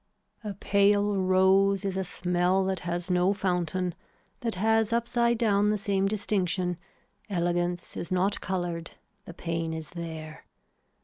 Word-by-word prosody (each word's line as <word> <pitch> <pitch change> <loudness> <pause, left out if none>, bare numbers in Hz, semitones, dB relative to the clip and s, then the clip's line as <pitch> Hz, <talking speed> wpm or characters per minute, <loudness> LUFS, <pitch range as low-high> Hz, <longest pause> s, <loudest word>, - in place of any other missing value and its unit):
A 205 -2 -5
pale 200 +1 +3
rose 190 +1 +3
is 195 -1 -1
a 190 - 0
smell 180 +1 +1
that 190 0 -1
has 175 +1 -3
no 180 +2 +3
fountain, 180 -1 -1 0.5
that 230 -3 -2
has 220 +3 +2
upside 235 0 +1
down 210 -3 +3
the 210 - +1
same 195 -1 0
distinction, 185 -4 0 0.5
elegance 175 -1 -1
is 170 - -5
not 190 +2 +1
coloured, 175 -3 -3 0.3
the 170 - -9
pain 165 -2 -3
is 160 -1 -6
there. 160 -3 -7
185 Hz, 135 wpm, -28 LUFS, 175-200 Hz, 0.5 s, pale